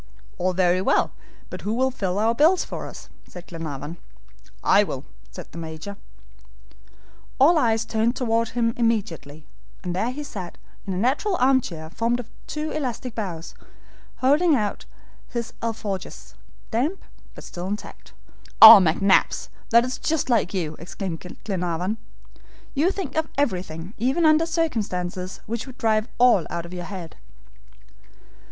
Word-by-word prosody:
"All 185 +1 +1
very 180 0 +2
well, - - +2 0.4
but - - -6
who 210 +2 -2
will 260 +2 +2
fill 195 -6 -2
our 220 +2 +2
bills 325 +8 +4
for - - -6
us?" - - -10 0.2
said 180 -1 -11
Glenarvan. 160 -1 -6 0.7
"I - - +5
will," - - -5 0.2
said - - -10
the 170 - -8
Major. 160 +5 -7 1.4
All 310 +5 +6
eyes 225 -3 +2
turned 225 +2 0
toward 230 -2 0
him 230 -1 0
immediately, 190 -11 -2 0.4
and 175 -1 -3
there 220 +6 0
he 285 +4 -5
sat 190 -10 -7 0.3
in 190 - -1
a - - -2
natural 270 - +1
arm 260 -2 +4
chair, 160 -7 -7
formed 230 +6 0
of 235 - -8 0.2
two 305 +1 -3
elastic 250 -4 -3
boughs, 180 -7 -5 0.6
holding 295 +5 +3
out 210 -5 -2 0.4
his 235 -2 -4
ALFORJAS 195 - -5 0.4
damp, 285 - -1 0.3
but - - -11
still 175 +1 -6
intact. 205 +2 -7 0.5
"Oh, 220 -1 +13
McNabbs, 190 +3 +2 0.2
that's 240 +2 +3
just 315 -5 0
like 220 -6 +2
you," 165 -6 -2
exclaimed 175 0 -5 0.2
Glenarvan, 180 +1 -2 0.7
"you 305 +6 +2
think 385 -7 -4
of 315 0 0
everything 185 - -2
even 265 +9 +2
under 310 +1 +5
circumstances 195 - -2
which 230 +4 -4
would 260 -1 -11
drive 220 0 +1
all 240 -8 +5
out 170 0 -4
of 170 - -10
your 180 -1 -5
head." 185 -5 -8
220 Hz, 145 wpm, -24 LUFS, 180-255 Hz, 1.4 s, Oh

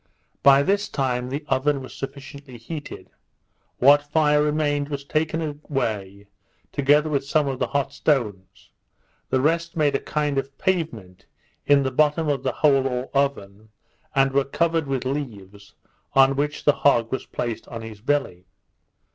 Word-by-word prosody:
By 140 0 +6
this 205 +4 0
time 125 -2 -1
the 145 +3 -4
oven 140 +1 +1
was 130 - -10
sufficiently 140 -1 -9
heated; 145 +6 -8 0.7
what 145 +3 +6
fire 150 0 +2
remained 150 -1 0
was 140 -1 -4
taken 160 +3 -1
away, 110 -10 -4 0.5
together 145 +2 +3
with 145 -3 0
some 145 +1 +1
of 135 -2 -3
the - - 0
hot 140 -1 -2
stones; 105 - -2 0.6
the 130 - +2
rest 165 +3 0
made 150 -2 +2
a - - +1
kind 150 -2 -1
of 135 0 -7
pavement 150 - -3 0.4
in 145 -1 +5
the 130 - -1
bottom 150 +3 +2
of 140 -3 0
the - - -1
hole 135 -2 +4
or 125 0 -4
oven, 110 -7 -2 0.5
and 135 0 +3
were 140 +1 +2
covered 165 +2 0
with 135 -2 -2
leaves, 105 -8 -6 0.4
on 135 0 +5
which 150 +2 -2
the 145 - +6
hog 120 -5 +3
was 130 - -3
placed 120 -2 -4
on 115 -1 -7
his 110 -2 -10
belly. 120 -9 -1
140 Hz, 155 wpm, -23 LUFS, 125-150 Hz, 0.7 s, By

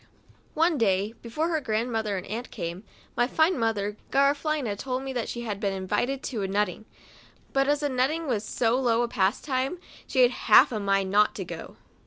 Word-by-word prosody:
Cb - - -29 0.5
T 330 +2 +3
E - - -2
clay, 200 0 +1
before 305 +8 -2
her 320 -2 0
grandmother 220 -3 -1
and 185 - -6
aunt 230 +5 -5
came, 175 0 -5 0.3
my 240 - +2
fine 320 +6 +2
mother, 210 -2 -1
Garafelina, 280 -4 +1
told 255 +4 -3
me 270 0 -4
that 240 -3 -2
she 240 - -4
had 210 -4 -4
been 200 -2 -1
invited 240 +8 -1
to 230 -6 -3
a 195 - -1
nutting, 205 +1 -1 0.7
but 270 0 +2
as 295 +1 +1
a - - +2
nutting 275 +6 0
was 230 -7 -1
so 230 +3 +1
low 240 -2 +2
a - - 0
pastime, 255 - 0 0.3
she 260 - +3
had 245 - +5
half - - +5
a 220 - -2
mind 195 -1 +1
not 210 +1 +4
to - - -4
go. - - -8
235 Hz, 205 wpm, -26 LUFS, 205-270 Hz, 0.7 s, had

